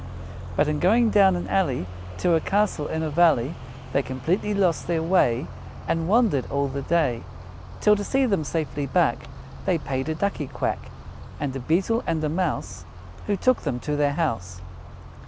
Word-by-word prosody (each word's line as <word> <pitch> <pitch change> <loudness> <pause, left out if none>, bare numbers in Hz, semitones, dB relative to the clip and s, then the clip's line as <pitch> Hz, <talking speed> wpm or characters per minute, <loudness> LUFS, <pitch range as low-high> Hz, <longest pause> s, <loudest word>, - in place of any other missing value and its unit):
"But 145 - +2
in 150 -1 0
going 225 +5 +4
down 195 -3 +5
an 175 - -4
alley 140 - 0 0.3
To 175 - +2
a 165 - +4
castle 195 -4 0
in 160 0 -2
a 155 - -2
valley, 155 -4 +3 0.4
They 140 - +3
completely 140 +11 -2
lost 185 -5 +1
their 165 -2 0
way, 160 -7 +2 0.4
And 165 0 0
wandered 210 - +2
all 140 0 0
the 140 +1 -4
day, 135 -6 +1 0.6
Till, 210 0 +5
to 205 - -3
see 270 +5 +1
them 195 -9 +1
safely 145 -1 -3
back, 130 - +1 0.4
They 180 - +2
paid 135 -1 -3
a 160 - -1
Ducky 160 -5 -2
Quack, - - -3 0.5
And 140 -2 -3
a - - -3
Beetle 185 - +1
and 160 -1 0
a 155 - +1
Mouse, 170 0 -2 0.4
Who 205 - +1
took 255 +6 +2
them 130 -5 -2
to 150 0 -2
their 145 -1 +1
house. 115 - -2
160 Hz, 175 wpm, -24 LUFS, 140-190 Hz, 0.6 s, down